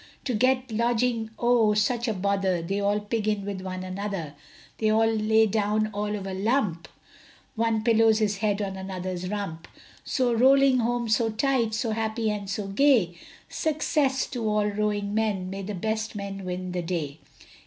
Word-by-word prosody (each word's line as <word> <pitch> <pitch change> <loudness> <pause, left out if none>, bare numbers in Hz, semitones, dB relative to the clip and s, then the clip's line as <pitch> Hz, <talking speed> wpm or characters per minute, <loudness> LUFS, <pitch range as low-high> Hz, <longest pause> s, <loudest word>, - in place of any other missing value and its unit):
To 255 - -1
get 255 +2 +1
lodging, 235 0 0
oh, 235 -3 +3
such 235 +3 +1
a 225 - +1
bother, 190 -2 0
They 195 +4 -2
all 205 +1 +1
pig 215 +1 -2
in 210 -2 0
with 200 -2 -4
one 185 0 -5
another, 185 -5 -4 0.5
They 215 - +2
all 220 +1 +4
lay 220 0 +3
down 215 0 0
all 210 +1 -2
of 200 -2 -5
a 195 - -4
lump, 195 -4 0 0.7
One 225 -1 0
pillows 225 -1 +4
his 210 -2 0
head 205 0 0
on 195 -1 -4
another's 185 -1 -4
rump. 195 -6 -4 0.4
So 250 -2 +1
rolling 265 +2 +5
home 240 0 0
so 225 +1 +2
tight, 230 -1 +1
So 220 +1 -1
happy 220 0 -1
and 200 -2 -4
so 200 +1 -3
gay, 215 -6 +3 0.3
Success 295 -3 0
to 245 -3 -3
all 210 0 +2
rowing 205 0 -1
men, 205 -4 -1
May 195 +1 -5
the 200 +1 -5
best 220 +4 -2
men 195 -1 -5
win 180 0 -4
the 180 0 -2
day. 160 -4 -3
210 Hz, 175 wpm, -26 LUFS, 195-225 Hz, 0.7 s, rolling